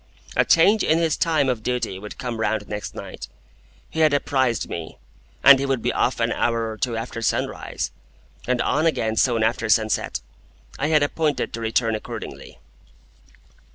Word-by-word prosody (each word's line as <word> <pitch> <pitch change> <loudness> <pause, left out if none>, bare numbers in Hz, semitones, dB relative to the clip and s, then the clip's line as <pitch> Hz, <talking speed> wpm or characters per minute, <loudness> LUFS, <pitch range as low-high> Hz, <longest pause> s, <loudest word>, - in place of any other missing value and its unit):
A - - +4
change 200 +6 +5
in 160 - +3
his 165 -2 +1
time 155 -5 +1
of 125 -4 -1
duty 120 -5 -2
would 105 +1 -9
come 120 -3 -4
round 110 -1 -1
next 105 -2 -5
night, - - -8 0.6
he 160 - -6
had 155 -2 +4
apprised 130 -5 0
me, 85 -2 -6 0.5
and 140 -1 +9
he 140 - -1
would 135 -4 -1
be - - 0
off - - 0
an - - +1
hour 115 -1 0
or 110 - -8
two 120 -3 -1
after 115 0 -5
sunrise, 115 - -2 0.6
and 125 -1 +1
on 155 +5 +2
again 110 -8 0
soon 115 -1 +2
after 115 0 0
sunset. 110 0 +1 0.6
I 145 - +1
had 155 -2 +4
appointed 150 0 -1
to 115 - -5
return 115 0 +1
accordingly. 110 - -7
120 Hz, 170 wpm, -23 LUFS, 110-145 Hz, 0.6 s, and